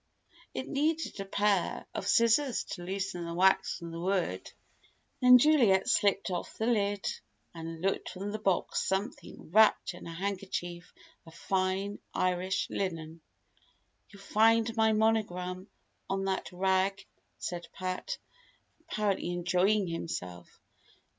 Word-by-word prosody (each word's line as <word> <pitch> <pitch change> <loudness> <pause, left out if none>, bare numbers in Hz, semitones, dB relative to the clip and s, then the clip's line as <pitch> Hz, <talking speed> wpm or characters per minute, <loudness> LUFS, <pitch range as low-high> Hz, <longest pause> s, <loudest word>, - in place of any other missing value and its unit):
It - - -3
needed 305 -3 -1
a 195 - -3
pair 200 -1 0
of - - -4
scissors 230 +3 +3
to 175 - -5
loosen 190 -1 -3
the 170 0 -5
wax 190 +2 +3
from 170 -2 -8
the 165 - -6
wood. 180 - -1 0.7
Then 250 0 +9
Juliet 240 -9 +4
slipped 200 -5 +2
off 175 - -4
the 220 - -1
lid, 205 -4 +1 0.5
and 165 0 -7
took 195 - 0
from 195 +2 -5
the 215 - -4
box 195 -3 0
something 190 -4 -4
wrapped 215 -1 +4
in 175 - -10
a - - -6
handkerchief 180 -1 -4 0.4
of 165 - -13
fine 190 +3 -1 0.2
Irish 185 +2 0
linen. 165 -4 -4 0.9
"You'll 200 -1 -14
find 225 +2 +3
my 220 -1 +4
monogram 200 -4 0 0.4
on 195 0 -1
that 190 0 -2
rag," 190 +1 +1 0.3
said 175 -1 -5
Pat, 185 - -4 0.6
apparently 210 - -1
enjoying 180 +4 +2
himself. 90 - -6
195 Hz, 125 wpm, -30 LUFS, 180-215 Hz, 0.9 s, Then